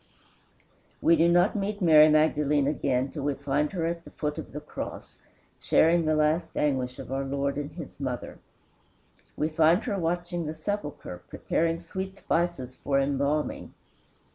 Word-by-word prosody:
We 165 - +5
do 165 +1 +4
not 175 +4 +3
meet 205 0 -2
Mary 155 -4 +7
Magdalene 150 -2 +3
again 135 -2 0
till - - -6
we 145 0 -1
find 140 +2 -1
her 170 -3 -1
at 170 0 -3
the - - -12
foot 150 -1 -4
of - - -8
the 150 - -5
cross, 150 - -8 0.4
sharing 165 +1 +3
the 155 0 +2
last 155 +2 +1
anguish 130 -3 0
of - - -9
our 135 +1 -1
Lord 140 +1 -2
and 145 +1 -4
his 160 -4 -9
mother. 130 -3 -5 1.0
We 155 - +1
find 160 +5 +3
her 205 -4 -2
watching 175 0 -2
the 155 - -4
sepulchre, 155 - -5
preparing 165 0 -1
sweet 190 +3 -6
spices 165 -10 -2
for 140 -1 0
embalming. 140 +2 -1
155 Hz, 160 wpm, -27 LUFS, 140-170 Hz, 1.0 s, Mary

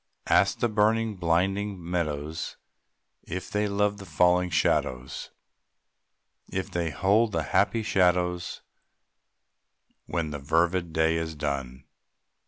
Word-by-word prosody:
Ask - - +3
the 120 - +4
burning, 110 0 +1
blinded 95 +4 0
meadows 80 -3 -3 0.6
If 90 +1 -6
they 105 0 +1
love 100 0 +1
the 100 - -10
falling 90 0 +3
shadows, 65 -6 0 1.2
If 95 0 -3
they 85 -2 -1
hold 105 +7 +2
the 80 - 0
happy 110 - +1
shadows 90 -3 +1 1.4
When 85 -3 -2
the 75 - -4
fervid 85 +4 +1
day 80 +1 +2
is 80 -1 -3
done. 70 -3 -3
90 Hz, 110 wpm, -27 LUFS, 80-100 Hz, 1.4 s, the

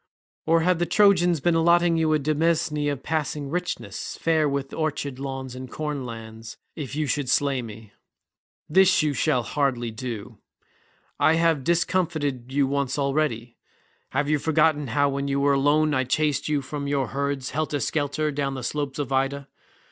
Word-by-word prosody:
Or 165 +1 +4
have 180 0 +2
the 175 - 0
Trojans 175 -4 +4
been 175 +2 +2
allotting 170 +1 +4
you 160 -1 +2
a - - +4
demesne 150 0 0
of 135 -2 -6
passing 150 -2 -2
richness, 180 +1 -4
fair 160 -2 +2
with 140 -1 -3
orchard 145 -4 -3
lawns 135 -2 -5
and 130 0 -8
corn 150 -4 -4
lands, 115 -1 -9 0.2
if 145 -4 -6
you 155 0 0
should 145 -2 -1
slay 140 -2 +2
me? 110 -2 -10 0.7
This 190 +1 +4
you 150 -2 +1
shall 140 -3 +1
hardly 125 -2 -1
do. 110 -2 -7 0.8
I 160 - +4
have 165 -4 +2
discomfited 155 -6 0
you 140 0 +2
once 140 0 -1
already. 140 -5 -1 0.5
Have 145 +2 -1
you 150 0 +2
forgotten 155 -1 +2
how 145 +5 +2
when 140 0 -2
you 140 0 0
were 140 0 +3
alone 145 +2 +3
I 130 -2 +2
chased 145 +2 0
you 145 -2 0
from 140 +1 -5
your 140 -3 0
herds 140 -2 -2
helter 155 -1 -1
skelter 150 +1 -1
down 140 -1 -2
the 130 - -6
slopes 145 +1 -3
of 145 -2 -3
Ida? 135 +1 -1
145 Hz, 170 wpm, -25 LUFS, 135-155 Hz, 0.8 s, Or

